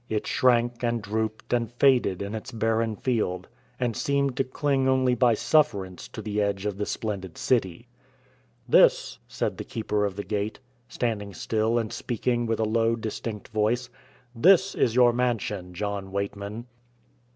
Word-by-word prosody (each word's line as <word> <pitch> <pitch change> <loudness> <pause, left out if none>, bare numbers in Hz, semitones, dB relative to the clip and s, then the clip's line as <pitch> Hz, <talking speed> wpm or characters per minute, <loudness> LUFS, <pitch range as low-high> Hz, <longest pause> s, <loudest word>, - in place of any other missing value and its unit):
It 110 -1 -1
shrank 120 -1 +2
and 120 0 +1
drooped 110 +2 -3
and 120 -2 0
faded 120 -8 +3
in 100 +2 -5
its 110 +4 -6
barren 115 -1 0
field, 110 -7 -1 0.3
and 120 -3 -1
seemed 140 0 0
to 135 - +3
cling 135 0 0
only 130 -1 +3
by 120 -1 +3
sufferance 115 - +1
to - - -8
the 105 -1 -1
edge 100 -1 -1
of 105 -1 -3
the 105 - -2
splendid 95 -6 -4
city. 95 -9 0 0.8
"This," - - +4
said - - -3
the - - -3
Keeper 105 -2 -2
of 100 -2 -3
the 100 - -4
Gate, 105 +1 -3 0.3
standing 105 -6 -3
still 110 +1 0
and 115 -2 -2
speaking 120 0 -1
with 115 0 -1
a 110 - +2
low, 115 +1 +2
distinct 110 -1 -5
voice 115 +3 0 0.4
"this 190 +9 +5
is 115 - +1
your 120 -1 +6
mansion, 110 -7 -1
John 100 0 -4
Weightman." 100 +3 -4
115 Hz, 160 wpm, -26 LUFS, 105-120 Hz, 0.8 s, your